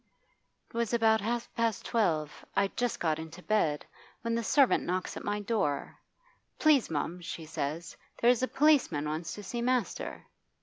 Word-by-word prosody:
'It - - -25
was 235 0 +1
about 220 -2 +4
half 235 +3 -1
past 230 -3 0
twelve 160 -10 0
I'd 195 - +1
just 245 -1 -1
got 160 -2 0
into 160 +3 -9
bed 160 -9 +1 0.4
when 230 0 -1
the 230 0 0
servant 275 +2 +4
knocks 185 +1 -2
at - - -6
my 205 0 -1
door. 200 -10 -1 0.6
"Please, 300 -6 +4
mum," 165 +3 -2
she 170 -2 -6
says, 155 +1 -4 0.2
"there's 240 0 +4
a 255 - +2
policeman 265 - +3
wants 155 +2 -3
to 205 - -8
see 235 +5 -4
master." 250 -2 -1
205 Hz, 165 wpm, -30 LUFS, 160-235 Hz, 0.6 s, about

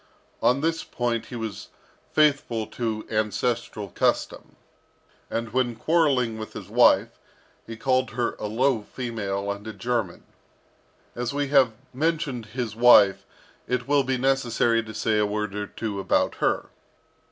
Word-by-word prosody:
On 130 +3 +3
this 165 +1 0
point 120 -2 -2
he 125 - -8
was 110 -4 -5 0.4
faithful 140 -7 +2
to 110 -1 -4
ancestral 110 -1 -1
custom; - - -1 0.7
and 115 -1 -3
when 125 -2 +1
quarrelling 130 -5 +1
with 110 - -7
his - - -8
wife, - - +4 0.5
he 115 - -7
called 130 +1 +1
her 120 +2 -2
a 105 - -3
low 120 +2 +1
female 105 -4 -4
and 100 +2 -7
a 110 - -5
German. 110 -2 -2 0.9
As 120 +3 -3
we 145 -1 -1
have 135 -5 +4 0.2
mentioned 145 -5 -1
his 115 -1 -4
wife, 110 -5 +6 0.4
it 125 0 -1
will 145 -1 +3
be 130 0 -1
necessary 120 -3 +2
to 110 -1 -9
say 110 -1 +1
a 105 - +3
word 105 -1 -3
or 105 0 -4
two 105 -2 -5
about 95 - +1
her. - - 0
115 Hz, 145 wpm, -25 LUFS, 110-130 Hz, 0.9 s, wife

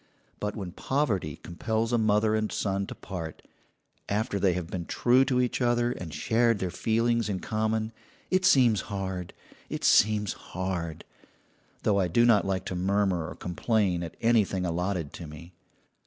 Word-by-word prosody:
But 105 0 -3
when 95 -5 -5
poverty 105 - -1
compels 110 +6 -2
a - - +4
mother 110 0 +3
and 110 0 0
son 100 -1 -1
to - - -7
part, 85 -5 -7 0.7
after 105 0 0
they 95 -2 +3
have 90 -1 -3
been 85 0 -5
true 125 +2 +4
to 125 -1 +1
each 125 +1 0
other, 120 0 +2
and 90 -9 -6
shared 115 +6 +2
their 95 -3 -3
feelings 115 +1 +1
in 95 -2 -1
common, 110 +1 -1 0.4
it 185 0 +3
seems 125 - +5
hard, 95 -3 -4 0.4
it - - -4
seems 105 -1 +4
hard 90 -3 -4 0.8
though 100 -2 +3
I 95 - +2
do 120 +8 +3
not 110 -5 +4
like 95 -1 -1
to 95 - -4
murmur 95 -2 +1
or - - -8
complain 90 0 0
at 85 -2 -7
anything 105 -5 +2
allotted 90 -2 -2
to 85 - -8
me. 85 +4 -11
100 Hz, 165 wpm, -28 LUFS, 90-115 Hz, 0.8 s, seems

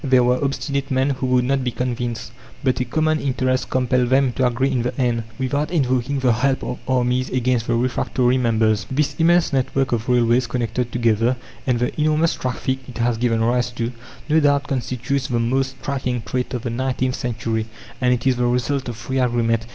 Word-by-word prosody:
There 130 -3 +4
were 125 +2 +2
obstinate 140 0 -2
men 130 +1 +1
who 130 -1 -2
would 125 -1 +3
not 135 0 +1
be 125 - 0
convinced. 120 -2 -3 0.3
But 130 -2 +1
a 125 - 0
common 155 +5 +1
interest 130 -2 0
compelled 125 -1 +1
them 135 0 +3
to 130 +1 +1
agree 130 +3 0
in 125 -2 +1
the 120 +3 -3
end, 120 -3 0
without 140 +3 -1
invoking 135 -4 0
the 130 -3 +3
help 130 +3 0
of 125 - -4
armies 125 0 +1
against 125 -2 0
the 120 - +1
refractory 125 +1 +1
members. 110 -3 +1
This 145 +2 0
immense 170 -1 +3
network 135 0 0
of 120 +1 -1
railways 120 0 +3
connected 120 0 -2
together, 115 +1 +2 0.3
and 125 -2 +2
the 125 +5 -1
enormous 155 +2 +2
traffic 130 +1 -2
it 125 - -9
has 120 -1 0
given 115 -2 +1
rise 120 +1 +1
to, 120 0 -2 0.4
no 160 +1 +4
doubt 145 -2 +3
constitutes 130 +1 -2
the 120 - -1
most 130 +3 0
striking 125 -4 -2
trait 125 0 -3
of 120 - -4
the 120 - -2
nineteenth 130 +1 -1
century; 115 -3 -2 0.3
and 125 -1 +3
it 125 0 0
is 130 -2 +3
the 120 0 +1
result 125 +2 0
of 115 - -6
free 130 +4 -3
agreement. 115 -2 +1
125 Hz, 200 wpm, -21 LUFS, 120-135 Hz, 0.4 s, There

